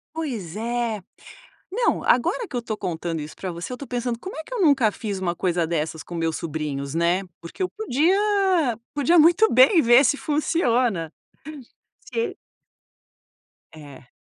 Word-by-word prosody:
Pois 230 - -4
é. 235 -2 -2 0.7
Não, 465 +5 0
agora 345 - +1
que 250 - -6
eu - - 0
estou 225 -2 -4
contando 170 -4 -4
isso 150 +1 -8
para 185 -2 -5
você, 170 +8 -6
estou 275 +3 -8
pensando 245 -1 -3
como 375 +10 -8
é 315 - -5
que 410 - -17
eu - - -2
nunca 280 - +4
fiz 205 -2 -5
uma 175 -2 -2
coisa 175 -2 0
dessas 160 -1 -3
com 175 - -10
meus 165 -1 -1
sobrinhos, 150 -3 -4
né, 170 +3 +1 0.2
porque 170 - -7
eu 370 - 0
podia 380 - +1 0.2
podia 295 +4 +3
muito 350 +8 +5
bem 265 - +6
ver 240 +1 +6
se 280 - +3
funciona, 245 - 0 1.0
se 460 0 -1
e - - -16 1.4
É. 145 -5 -13
235 Hz, 160 wpm, -23 LUFS, -, 1.4 s, bem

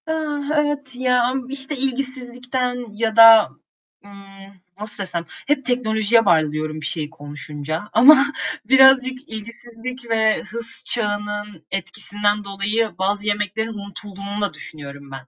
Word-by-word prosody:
Ah, 310 -2 -2
evet, 290 -3 -1
ya, 250 -1 +2
am 255 +1 -2
işte, 275 +1 -4
ilgisizlikten 250 -1 -3
ya 220 -1 -1
da, 225 -1 +9 0.6
ımm, 195 -1 -15 0.2
nasıl 210 -1 -6
desem 170 -3 -4 0.2
hep 280 -2 +1
teknolojiye 225 -2 +2
bağlı 155 -5 +3
diyorum 155 0 -4
bir - - -6
şeyi 155 -3 -3
konuşunca 150 +3 -6
ama 270 +5 +8 0.4
birazcık 265 +2 +5
ilgisizlik 235 +3 -8
ve 220 -1 +2
hız 235 0 -8
çağının 210 -4 -2
etkisinden 205 +3 -1
dolayı 205 +3 -1
bazı 205 +2 -1
yemeklerin 210 +2 -1
unutulduğunu 200 0 -7
da 205 - -1
düşünüyorum 140 -2 -7
ben. 135 -1 -9
220 Hz, 125 wpm, -21 LUFS, 200-250 Hz, 0.6 s, da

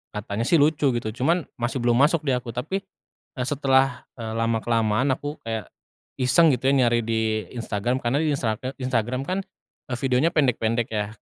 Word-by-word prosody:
katanya 105 +2 -3
sih - - +4
lucu 145 -3 +3
gitu, 115 -2 -2
cuman 155 +9 +1 0.2
masih 120 +2 -2
belum 120 0 +3
masuk 150 +3 +4
di 140 - 0
aku. 120 -1 -7
Tapi 155 +11 -2 0.5
e 135 - -5
setelah, 135 -2 +1
eee, 110 -2 -5
lama-kelamaan 115 +1 +1
aku 145 +2 -7
kayak 115 -1 -4 0.5
iseng 150 +5 +5
gitu 130 +2 +1
ya 140 - +3
nyari 120 0 +2
di 110 -1 -1
Instagram. 115 +2 -1
Karena 130 +4 0
di 160 - +1
Instra 120 -6 0
e 130 +1 -4
Instagram 125 +1 -1
kan 185 +4 -1 0.5
e - - -3
videonya 130 +4 +2
pendek-pendek 120 -4 +1
ya. 105 -1 -1
125 Hz, 175 wpm, -24 LUFS, 115-140 Hz, 0.5 s, iseng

